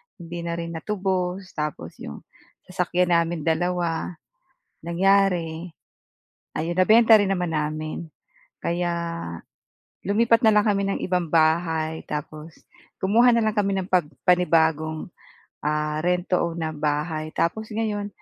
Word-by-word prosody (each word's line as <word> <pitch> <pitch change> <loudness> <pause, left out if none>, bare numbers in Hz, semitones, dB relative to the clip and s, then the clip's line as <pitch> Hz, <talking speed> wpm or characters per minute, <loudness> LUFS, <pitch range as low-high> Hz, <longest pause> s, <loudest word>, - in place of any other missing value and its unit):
hindi 170 -1 -8
na 170 0 -2
rin 170 0 -5
natubos, 185 0 -2
tapos 150 -2 -5
iyong 70 - -8 0.5
sasakyan 180 -1 +1
namin 165 -1 -2
dalawa, 170 +1 -1 0.7
nangyari, 175 -2 +2 0.9
ayun, 165 +3 -1
nabenta 220 +2 +7
rin 200 - +2
naman 180 -3 -1
namin, 155 +1 -3 0.5
kaya 175 0 -1 1.1
lumipat 230 +4 +3
na 220 - +6
lang 210 0 +3
kami 200 -1 +2
ng - - -1
ibang 180 -3 -1
bahay 160 0 +1
tapos 155 +1 -6 0.4
kumuha 230 +6 +4
na 235 - +4
lang 215 - +1
kami 200 -2 +1
ng 185 - -2
pag 185 -2 +3 0.2
panibagong 160 -3 +2 0.6
ah, 150 +1 -1
rent 180 +1 0
to 180 - +1
own 170 0 -2
na 160 -1 -2
bahay 155 +1 -2
tapos 215 +6 -1
ngayon 210 -2 -2
175 Hz, 130 wpm, -24 LUFS, 160-195 Hz, 1.1 s, nabenta